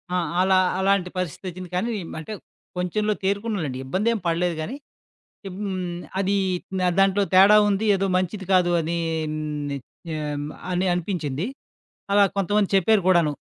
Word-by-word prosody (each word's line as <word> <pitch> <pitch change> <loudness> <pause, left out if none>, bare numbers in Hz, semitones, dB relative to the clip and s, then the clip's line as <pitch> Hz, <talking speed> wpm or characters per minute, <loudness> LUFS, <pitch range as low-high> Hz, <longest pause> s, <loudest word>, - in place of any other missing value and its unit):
ఆ! - - +2 0.2
అలా 190 0 +4 0.2
అలాంటి 190 -1 +2
పరిస్థితొచ్చింది 185 +1 -5
కానీ, 215 +7 0 0.3
అంటే 160 +7 -7 0.4
కొంచెంలో 210 +4 0
తేరుకున్నలెండి 195 - -1
ఇబ్బందేం 215 - 0
పడలేదు 170 +1 0
గానీ 225 +12 -4 0.7
హ్మ్. 185 -2 -4 0.2
అది 195 +1 +1 0.5
అ - - +3
దాంట్లో 195 +1 +4
తేడా 195 +3 +8
ఉంది 205 +2 0
ఏదో 195 0 0
మంచిది 185 +2 -2
కాదు 180 -2 +4
అని. 165 +1 -2 0.7
నే 140 - -2 0.3
హ్మ్. 150 -2 -3 0.2
అని 180 +1 0
అనిపించింది. 170 -3 -2 0.7
అలా 200 0 +6
కొంతమంది 200 +1 +1
చెప్పారు 200 +2 +3
కూడాను, 170 -5 +4
185 Hz, 130 wpm, -24 LUFS, 175-200 Hz, 0.7 s, తేడా